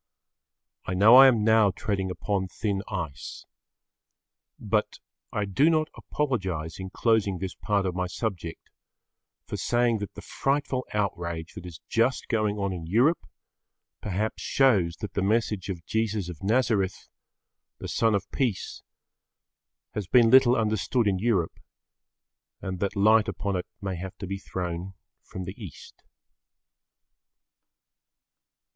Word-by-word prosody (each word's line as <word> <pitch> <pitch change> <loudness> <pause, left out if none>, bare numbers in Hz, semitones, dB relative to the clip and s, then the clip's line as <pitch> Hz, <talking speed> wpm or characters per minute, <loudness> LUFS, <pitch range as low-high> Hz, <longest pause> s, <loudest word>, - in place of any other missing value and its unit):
I 95 - -1
know 105 +6 +7
I 135 0 +10
am 115 -5 +3
now 110 -1 +5
treading 95 -1 -2
upon 95 +1 -2
thin 100 +1 -2
ice. 80 - -6 1.1
But - - -1 0.3
I 105 - -1
do 135 - +3
not 155 -1 +1
apologise 95 - -3
in 95 0 -5
closing 105 -2 +1
this 95 +1 -4
part 100 -2 -1
of 90 - -1
my 90 +1 -2
subject, 90 -4 -5 0.7
for - - -5
saying 120 -2 +1
that 105 - -6
the - - -9
frightful 135 -2 -1
outrage 85 -5 -3
that 90 - -9
is 85 -3 -10
just 115 +3 +1
going 110 -3 +1
on 100 -2 -1
in 85 -3 -6
Europe, 120 - +2 0.7
perhaps 105 +2 -2
shows 100 -12 +3
that 105 - -5
the 100 - -1
message 105 -1 0
of 85 -4 -5
Jesus 110 -4 -1
of 80 -5 -9
Nazareth, 105 -3 +1 0.7
the - - -7
Son 115 -2 +2
of 100 -1 -1
Peace, 120 -9 -2 1.1
had 100 -4 -4
been 120 -3 +5
little 130 -2 +7
understood 110 +2 +1
in 95 -2 +1
Europe, 100 -6 0 1.0
and 95 -2 -5
that 100 +2 -1
light 110 +2 +5
upon 100 -1 -2
it 90 - -3
may 95 -2 -4
have 95 +2 -7
to 100 - -6
be 100 +1 -4
thrown 90 0 -5 0.3
from 95 - -8
the 95 +1 -6
East. 85 -9 -11
100 Hz, 140 wpm, -27 LUFS, 95-115 Hz, 1.1 s, I